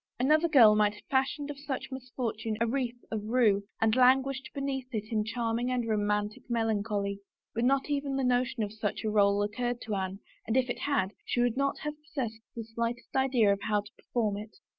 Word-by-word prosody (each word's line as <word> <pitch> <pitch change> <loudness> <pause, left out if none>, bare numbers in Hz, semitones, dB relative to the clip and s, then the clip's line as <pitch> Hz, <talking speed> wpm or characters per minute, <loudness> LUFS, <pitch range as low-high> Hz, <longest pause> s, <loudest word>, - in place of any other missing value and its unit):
Another 305 +6 +4
girl 240 -9 +7
might 210 -1 +3
have - - -15
fashioned 280 +2 0
of 285 - -9
such 280 -2 -4
misfortune 240 -4 -4
a 230 - +3
wreath 245 0 -1
of 215 -2 -2
rue 215 -4 +3
and 225 0 +3
languished 265 +1 +3
beneath 275 -2 -3
it 215 +1 -4
in 215 -2 +1
charming 230 +2 -1
and 250 -2 -1
romantic 210 -1 0
melan 225 -3 +1
choly, 200 -2 -2 0.3
but 230 - -1
not 270 +1 +2
even 280 -2 -1
the 270 - 0
notion 250 -1 +1
of 205 0 -4
such 215 -2 -3
a 215 - 0
role 200 -1 +4
occurred 240 +4 -2
to 220 - -4
Anne, 190 -1 -2 0.3
and 225 +3 +1
if 255 -1 +2
it - - -5
had, 260 -10 0
she - - -1
would 245 -1 +2
not 275 +1 0
have 300 -1 -3
possessed 255 -8 -4
the 230 - -4
slightest 230 +2 -4
idea 250 -6 +4
of 200 - -5
how 210 0 +1
to 205 - -15
perform 215 -4 -1
it. 210 0 -9
235 Hz, 205 wpm, -30 LUFS, 210-260 Hz, 0.3 s, girl